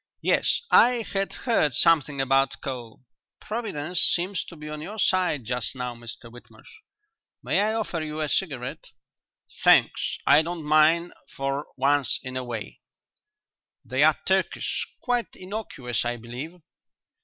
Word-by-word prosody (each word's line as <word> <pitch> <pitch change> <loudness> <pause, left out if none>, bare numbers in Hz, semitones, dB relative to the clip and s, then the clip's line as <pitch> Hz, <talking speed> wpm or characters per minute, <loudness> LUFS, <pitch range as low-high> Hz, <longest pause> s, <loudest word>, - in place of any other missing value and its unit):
Yes, - - +2
I 240 0 +5
had 195 -2 -2
heard 155 - +1
something 150 -3 +3
about 135 0 +2
coal. 120 -4 -6 0.4
Providence 185 -7 -3
seems 180 +2 +1
to 170 - -11
be 150 -1 -9
on 150 0 -6
your 205 +7 -7
side 180 - +1
just 125 +2 -1
now, 125 -1 -4
Mr 115 0 -9
Whitmarsh. 120 0 -16 0.7
May - - +2
I 215 +2 +1
offer 210 -7 -2
you 155 0 -5
a 155 - 0
cigarette?" 140 -7 -2 0.8
"Thanks, - - +4
I 145 +2 +7
don't 170 0 -5
mind 155 +3 +3 0.2
for 135 +1 -2
once 140 -1 +2
in 130 0 -6
a 130 - -2
way." 120 -3 -6 1.1
"They're - - +3
Turkish; - - 0 0.2
quite 245 -2 -1
innocuous, 185 - -4
I 120 0 -2
believe." 125 +10 -8
150 Hz, 135 wpm, -25 LUFS, 130-185 Hz, 1.1 s, I